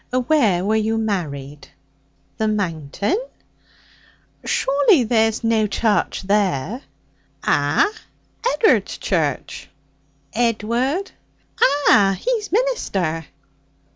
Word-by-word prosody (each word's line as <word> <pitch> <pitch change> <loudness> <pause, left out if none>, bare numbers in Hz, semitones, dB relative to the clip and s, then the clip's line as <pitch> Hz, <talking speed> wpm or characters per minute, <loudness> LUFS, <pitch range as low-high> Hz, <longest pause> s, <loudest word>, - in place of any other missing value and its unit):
'Where 220 - +2
were 215 +2 +1
you 220 +1 0
married?' 150 -10 -4 0.7
'The 220 - +1
Mountain.' 200 - -2 1.2
'Shawly 280 - +3
there's 225 -1 +1
no 225 -2 +2
charch 210 0 0
there?' 200 - 0 0.6
'Ah! 415 - +2 0.6
Ed'ard's 245 - +2
church.' 155 -8 -2 0.6
'Edward?' 240 - 0 0.5
'Ah! 210 -8 +4
He's 455 -4 -2
minister.' 195 - -1
220 Hz, 75 wpm, -20 LUFS, 190-270 Hz, 1.2 s, Ah